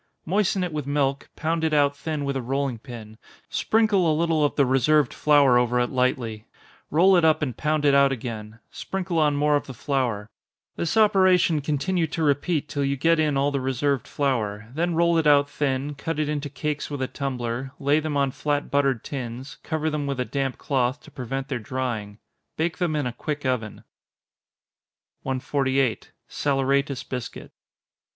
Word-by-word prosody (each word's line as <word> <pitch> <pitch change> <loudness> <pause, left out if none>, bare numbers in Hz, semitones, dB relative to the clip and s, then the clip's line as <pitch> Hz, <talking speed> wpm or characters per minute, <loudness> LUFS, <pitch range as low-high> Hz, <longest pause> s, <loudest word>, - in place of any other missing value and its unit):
Moisten 195 +1 +1
it 175 -3 -3
with 150 -3 -4
milk, 140 -1 0
pound 160 +1 -1
it 160 -1 +1
out 145 -1 +3
thin 150 -1 -3
with 140 0 -2
a 135 - -1
rolling 135 -1 -2
pin, 110 -3 -10 0.3
sprinkle 210 -6 +2
a 155 - +1
little 165 -2 +2
of 145 - +1
the 140 - +4
reserved 135 +2 +3
flour 140 -5 +4
over 125 0 +1
it 125 - 0
lightly 120 -4 -1 0.4
roll 185 +5 +5
it 175 - +4
up 160 -1 +3
and 130 -6 -2
pound 155 +1 0
it 140 - +5
out 140 0 +5
again, 110 -3 -6
sprinkle 185 -3 -3
on 150 -2 +3
more 150 +1 +2
of 145 - -1
the 130 - -8
flour 125 -8 -1 0.5
this 170 +6 -1
operation 185 -7 +4
continue 160 +4 0
to 160 +1 -3
repeat 150 +2 +1
till 145 -1 -2
you 140 0 0
get 165 +4 +3
in 150 -3 +2
all 140 +1 +2
the 140 -1 -1
reserved 135 0 -1
flour 110 -6 -2
then 170 +3 0
roll 170 0 +3
it 160 - +1
out 145 -1 +5
thin, 140 0 -2
cut 150 +2 -4
it 155 -1 0
into 145 -1 -3
cakes 150 +1 -3
with 145 -3 -3
a - - -1
tumbler, 130 -1 -4
lay 145 +2 +3
them 155 -2 -2
on 140 -1 +1
flat 145 +2 -2
buttered 140 -4 +1
tins, 130 0 -6
cover 155 -1 -2
them 150 -2 -1
with 140 -2 -3
a 125 - 0
damp 135 -2 -2
cloth, 130 -1 0
to 155 - -15
prevent 135 0 -4
their - - -3
drying. 110 -3 -4 0.4
Bake 165 +3 -1
them 170 -4 0
in 145 -2 0
a 125 - -3
quick 145 +3 -4
oven. 115 -5 -2 1.4
148. 130 -1 -1 0.2
_Saleratus 140 -1 0
Biscuit. 125 -3 -6
140 Hz, 185 wpm, -24 LUFS, 130-155 Hz, 1.4 s, roll